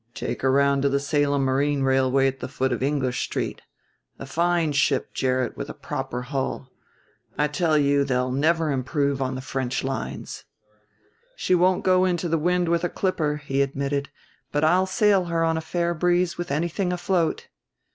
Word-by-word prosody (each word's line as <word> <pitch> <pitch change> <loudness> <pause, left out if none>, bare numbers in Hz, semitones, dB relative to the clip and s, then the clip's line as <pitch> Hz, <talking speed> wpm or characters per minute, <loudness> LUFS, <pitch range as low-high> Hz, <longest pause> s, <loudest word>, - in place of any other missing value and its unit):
"Take - - -4
her 130 - +2
around 140 +1 +3
to 140 - +2
the 140 0 +1
Salem 140 -1 +1
Marine 140 +1 +1
Railway 135 0 +3
at 135 0 0
the - - -5
foot 130 0 -1
of 120 - -2
English 130 -2 0
Street. - - -3 0.6
A - - -8
fine 170 +2 +1
ship, 140 -1 +1
Gerrit, 130 -2 0
with - - -6
a - - -7
proper 125 +1 -4
hull. 130 0 -4 0.7
I 150 - +2
tell 155 +1 +1
you 140 -1 +3
they'll 125 -2 0
never 155 +3 +1
improve 140 +1 -1
on 130 0 -1
the 130 - -5
French 130 -1 -3
lines." 135 0 -5 0.9
"She 185 - 0
won't 180 +1 +3
go 185 0 +4
into 175 -1 0
the 165 -1 +1
wind 180 +2 +1
with 170 0 +1
a 175 - 0
clipper," 150 -7 -1
he 135 0 0
admitted; 140 +1 -1 0.4
"but 145 +1 0
I'll 180 +4 +3
sail 200 -2 +3
her 165 -1 0
on 165 0 +2
a 160 - -2
fair 170 +1 -1
breeze 175 +1 +1
with 175 - -5
anything 170 +5 -1
afloat." 175 -1 -1
145 Hz, 180 wpm, -24 LUFS, 135-170 Hz, 0.9 s, go